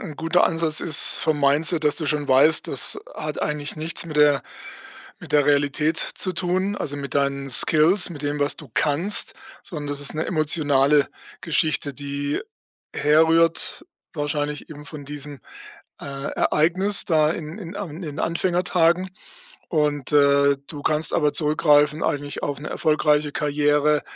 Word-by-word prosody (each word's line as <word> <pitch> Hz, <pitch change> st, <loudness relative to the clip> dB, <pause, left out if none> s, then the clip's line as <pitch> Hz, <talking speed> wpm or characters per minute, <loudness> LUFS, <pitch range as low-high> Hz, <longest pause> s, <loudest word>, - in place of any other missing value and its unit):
'n 150 Hz, -, -9 dB
guter 165 Hz, +2 st, +2 dB
Ansatz 165 Hz, -2 st, -1 dB
ist 155 Hz, -3 st, +4 dB
vom 155 Hz, -2 st, 0 dB
Mindset, 150 Hz, +3 st, +1 dB
dass 145 Hz, 0 st, +2 dB
du 155 Hz, -, -2 dB
schon 145 Hz, -1 st, -1 dB
weißt, 140 Hz, +4 st, +4 dB
das -, -, -3 dB, 0.2 s
hat -, -, -5 dB
eigentlich 150 Hz, 0 st, -3 dB
nichts 165 Hz, +2 st, -3 dB
mit 155 Hz, -2 st, -6 dB
der 145 Hz, -2 st, +4 dB, 0.8 s
mit -, -, -12 dB
der 145 Hz, -2 st, +4 dB
Realität 145 Hz, +2 st, +1 dB
zu 185 Hz, -, -1 dB
tun, 185 Hz, +3 st, -1 dB
also, 145 Hz, -1 st, -4 dB
mit 140 Hz, -1 st, -6 dB
deinen 140 Hz, -1 st, -1 dB
Skills, 165 Hz, +8 st, +4 dB
mit 150 Hz, -3 st, -9 dB
dem, 145 Hz, 0 st, -2 dB
was 145 Hz, -, +1 dB
du 145 Hz, -7 st, -13 dB
kannst, 165 Hz, +8 st, 0 dB, 0.3 s
sondern 150 Hz, -6 st, -7 dB
das 145 Hz, 0 st, -3 dB
ist 145 Hz, +1 st, -2 dB
'ne 155 Hz, -, -2 dB
emotionale 145 Hz, -3 st, +2 dB, 0.3 s
Geschichte, 155 Hz, -3 st, 0 dB
die 145 Hz, +1 st, -3 dB, 0.5 s
herrührt, 160 Hz, -, +2 dB, 0.3 s
wahrscheinlich 145 Hz, 0 st, -3 dB
eben 150 Hz, -1 st, -11 dB
von 150 Hz, -3 st, -9 dB
diesem, 145 Hz, -2 st, -8 dB, 0.6 s
äh, -, -, -9 dB, 0.3 s
Ereignis 185 Hz, +6 st, +2 dB
da 155 Hz, -2 st, +2 dB
in 165 Hz, +4 st, -7 dB
in 180 Hz, -1 st, -8 dB
An 195 Hz, -6 st, -5 dB
in -, -, -9 dB
den 150 Hz, -3 st, -7 dB
Anfängertagen. 180 Hz, +1 st, +1 dB, 0.6 s
Und, 150 Hz, -3 st, 0 dB
äh, 140 Hz, -1 st, +4 dB
du 145 Hz, -2 st, -7 dB
kannst 155 Hz, 0 st, +1 dB
aber 150 Hz, -2 st, +2 dB
zurückgreifen 150 Hz, -1 st, +3 dB
eigentlich 145 Hz, 0 st, -3 dB
auf 145 Hz, -1 st, -3 dB
'ne 150 Hz, -, -6 dB
erfolgreiche 150 Hz, -1 st, +1 dB
Karriere 150 Hz, 0 st, +1 dB
150 Hz, 155 wpm, -22 LUFS, 145-165 Hz, 0.8 s, ist